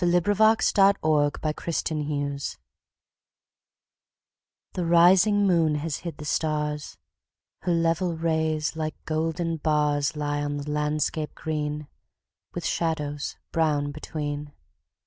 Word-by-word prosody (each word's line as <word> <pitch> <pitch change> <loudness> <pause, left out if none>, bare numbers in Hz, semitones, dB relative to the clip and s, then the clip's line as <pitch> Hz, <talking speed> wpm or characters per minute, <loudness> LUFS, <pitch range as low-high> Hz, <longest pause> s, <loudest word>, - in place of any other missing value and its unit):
Henry 175 +3 +3
Wadsworth 220 0 +3
Longfellow 155 -7 +4 0.6
Endymion 145 -2 -2 2.3
THE 180 - -2
rising 180 +5 +5
moon 165 -5 +3
has 150 0 -2
hid 170 -4 -7
the 150 - -8
stars; 150 -1 -2 0.6
Her 180 - -1
level 165 +1 +1
rays, 160 -1 0
like 155 -1 -3
golden 165 +1 -1
bars, 150 -2 +1
Lie 145 -1 -1
on 145 0 -2
the 145 +1 -5
landscape 150 +1 -1
green, 150 -1 -3 0.7
With - - -4
shadows 150 -3 -2 0.2
brown 150 -3 +1
between. 145 -1 -5
155 Hz, 105 wpm, -26 LUFS, 150-165 Hz, 2.3 s, rising